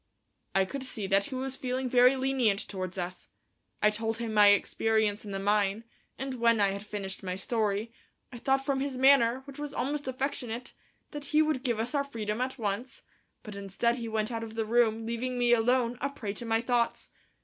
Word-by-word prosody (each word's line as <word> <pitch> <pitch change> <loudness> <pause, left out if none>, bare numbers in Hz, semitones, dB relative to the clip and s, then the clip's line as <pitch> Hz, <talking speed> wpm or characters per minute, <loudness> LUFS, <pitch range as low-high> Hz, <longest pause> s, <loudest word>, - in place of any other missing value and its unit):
I 195 0 +4
could 265 +7 -5
see 220 -6 -4
that 195 +1 +3
he 265 - -5
was 265 0 -3
feeling 255 0 -2
very 250 +1 +5
lenient 260 -6 +1
towards 185 -2 -5
us. 180 0 -5 0.6
I 210 - +6
told 225 +1 -2
him 230 -1 -3
my 210 -1 +7
experience 215 +1 +2
in 210 - -8
the 195 - -3
mine, 205 +1 +1 0.3
and 265 -2 -4
when 230 -1 +4
I 200 -1 +3
had 200 +1 -5
finished 200 -2 -5
my 185 -1 -3
story, 215 +2 -1 0.4
I 240 - -8
thought 270 +2 +1
from 275 -1 0
his 270 -1 -2
manner, 260 -2 +5
which 280 0 -11
was 295 -1 -5
almost 290 +1 -2
affectionate, 255 -2 -3 0.4
that 295 -2 -6
he 305 +2 +3
would 305 -4 0
give 240 -5 -1
us 230 +5 -2
our 285 -1 +2
freedom 225 -4 -4
at 260 +1 -2
once, 220 +3 -3 0.4
but 210 -2 -8
instead 200 +5 0
he 235 -2 -4
went 220 0 -1
out 230 -1 -3
of 225 -1 -7
the 225 -1 -1
room, 225 -1 +2
leaving 240 +2 -3
me 240 0 +4
alone, 240 +1 +2
a 280 - 0
prey 220 -8 -5
to 230 +3 -7
my 225 0 +2
thoughts. 240 -1 0
230 Hz, 205 wpm, -29 LUFS, 210-260 Hz, 0.6 s, my